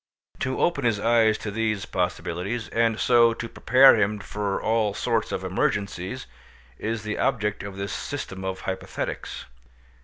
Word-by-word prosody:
To 130 -1 -2
open 155 -5 +1
his 115 -4 +2
eyes 110 -1 +3
to 105 - -5
these 110 -2 -1
possibilities, 90 +5 -2
and 115 -1 +1
so 120 -2 +5
to 115 - -5
prepare 130 +3 +6
him 105 +1 +1
for 100 0 -3
all 110 -2 +1
sorts - - 0
of - - -3
emergencies, 100 +4 -2 0.5
is 110 -1 -3
the 110 0 -3
object 105 -2 0
of 100 -1 -7
this 100 -1 -4
system 95 -9 -5
of 95 0 -4
hypothetics. 95 -8 -5
105 Hz, 150 wpm, -25 LUFS, 100-115 Hz, 0.5 s, prepare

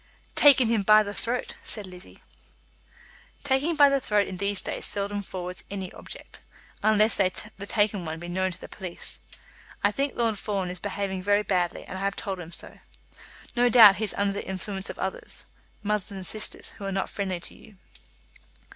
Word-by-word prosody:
"Taken 275 -4 +7
him 225 -2 +2
by 215 +2 +6
the 205 0 -5
throat," 240 +4 -2
said 210 -3 -3
Lizzie. 180 -1 -12 1.2
"Taking 285 +4 +1
by 290 -1 +8
the 275 0 +3
throat 210 -5 +1
in 185 - -6
these 200 +1 +1
days - - -3
seldom 205 0 -2
forwards 180 -2 -6
any 190 -2 -5
object, - - -10 0.4
unless 215 0 +4
the 200 +1 -1
taken 205 -3 +1
one 160 0 -4
be 175 - -7
known 185 +2 0
to 175 - -10
the - - -9
police. 185 -3 -6 0.6
I 205 - +5
think 275 +6 -1
Lord 225 -3 +1
Fawn 195 -4 -2
is 180 - -5
behaving 195 -1 -3
very 205 +2 +3
badly, 180 -3 0
and 190 - -7
I - - -6
have 200 0 0
told 195 -3 -4
him 170 -1 -8
so. 170 - -7 0.8
No 245 0 +4
doubt 220 -5 +9
he 220 - 0
is - - -4
under 200 0 +1
the 200 - -5
influence 190 +1 -4
of - - -6
others, 190 - -5 0.4
mother 210 -1 -1
and 190 -1 -5
sisters, 215 +3 +1
who 200 - -6
are 195 - -2
not 195 0 -1
friendly 190 -3 -2
to - - -7
you." 215 - -17
200 Hz, 190 wpm, -27 LUFS, 190-215 Hz, 1.2 s, doubt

